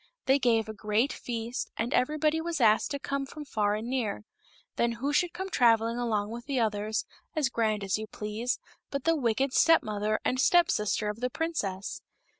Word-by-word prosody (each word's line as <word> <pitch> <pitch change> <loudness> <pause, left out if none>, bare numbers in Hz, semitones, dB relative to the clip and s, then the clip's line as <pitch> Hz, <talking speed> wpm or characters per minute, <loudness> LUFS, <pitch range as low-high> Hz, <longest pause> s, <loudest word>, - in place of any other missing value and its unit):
They 270 +1 +4
gave 230 -4 +2
a 220 - -5
great 215 +6 0
feast, 235 0 -4
and 235 +4 -1
everybody 305 +4 +2
was, 335 -2 -2
asked 220 -3 +4
to 285 - -2
come 275 0 -3
from 300 +2 -8
far 210 -5 0
and 220 +2 -4
near. 230 -5 -2 0.5
Then 235 0 +1
who 270 +5 -2
should 335 +4 +2
come 380 +2 -5
travelling 230 -1 +3
along 215 -3 -1
with 240 +2 -7
the 275 -3 0
others, 215 -1 0 0.3
as 300 -4 +2
grand 215 -4 0
as 195 +1 0
you 220 - -5
please, 215 +4 -3 0.3
but 280 -2 -3
the 330 +1 +3
wicked 260 0 0
step 330 0 +5
mother 215 0 -1
and 255 +1 +1
step 350 +2 +5
sister 210 0 0
of 210 +1 -3
the 250 +1 -1
princess. 215 - -3
235 Hz, 195 wpm, -29 LUFS, 215-280 Hz, 0.5 s, step